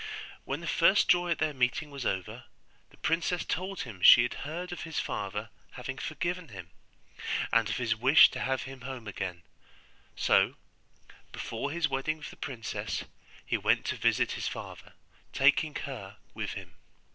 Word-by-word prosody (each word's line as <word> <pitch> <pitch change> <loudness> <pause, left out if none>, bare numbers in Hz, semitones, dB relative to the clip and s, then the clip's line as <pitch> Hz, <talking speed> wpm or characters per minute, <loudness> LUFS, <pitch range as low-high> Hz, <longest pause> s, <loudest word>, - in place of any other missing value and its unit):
When 140 +4 -3
the 170 - -6
first 190 +4 +4
joy 175 0 +4
at 170 - +1
their 155 -1 0
meeting 130 +3 0
was 140 -3 -3
over, 95 -2 -3 0.4
the - - -21
princess 170 +1 0
told 185 +2 -3
him 105 -8 -8
she 120 - +10
had 125 - -1 0.2
heard 175 +3 -5
of 175 - -5
his 160 -1 -3
father 105 +3 -4 0.2
having 130 +1 -6
forgiven 170 +4 -3
him, 95 -7 -10 0.8
and 115 -2 +4
of 110 - -1
his 115 -3 +1
wish 130 +7 +7
to - - -5
have 130 0 -1
him 135 -1 -9
home 125 -3 -7
again: 95 -4 -5 0.7
so, - - +3 0.8
before 115 +5 -4
his 160 +1 +1
wedding 135 +3 -1
with 155 - -8
the - - -12
princess, 120 -5 -4 0.4
he - - 0
went - - +2
to - - -1
visit - - +2
his - - -3
father, - - -7 0.4
taking 145 +2 +3
her 105 -7 -6 0.2
with - - -4
him. - - -9
135 Hz, 170 wpm, -30 LUFS, 115-160 Hz, 0.8 s, she